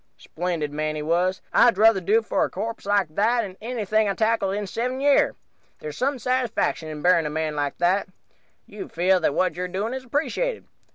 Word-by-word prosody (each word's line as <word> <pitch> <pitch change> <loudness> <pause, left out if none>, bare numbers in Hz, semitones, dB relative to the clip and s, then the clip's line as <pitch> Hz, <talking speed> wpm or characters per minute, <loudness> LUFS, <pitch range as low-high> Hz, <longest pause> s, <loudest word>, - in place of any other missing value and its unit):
"Splendid 165 -4 -4
man, 155 +1 -2
he 150 - -4
was. 175 +4 0
I'd 240 - +5
druther 215 -1 +5
do 215 +5 +2
for - - 0
a - - -1
corpse 220 +2 -5
like 200 -6 +1
that 230 +6 +2
'n 190 -3 -7
any 235 +1 -4
I've 210 0 +1
tackled 220 -3 +1
in 205 0 -3
seven 250 +6 -3
year. 285 0 +3 0.4
There's 150 -1 -7
some 270 - 0
satisfaction 250 -9 -1
in 150 -1 -7
buryin' 175 -3 +4
a - - -3
man 155 0 -2
like 145 -1 -2
that. 180 +4 +1 0.6
You 380 - -9
feel 185 +2 +2
that 160 - 0
what 185 -2 +1
you're 180 +1 -3
doing 200 +6 -3
is 260 0 -5
appreciated. 325 - -2
195 Hz, 195 wpm, -24 LUFS, 170-230 Hz, 0.6 s, I'd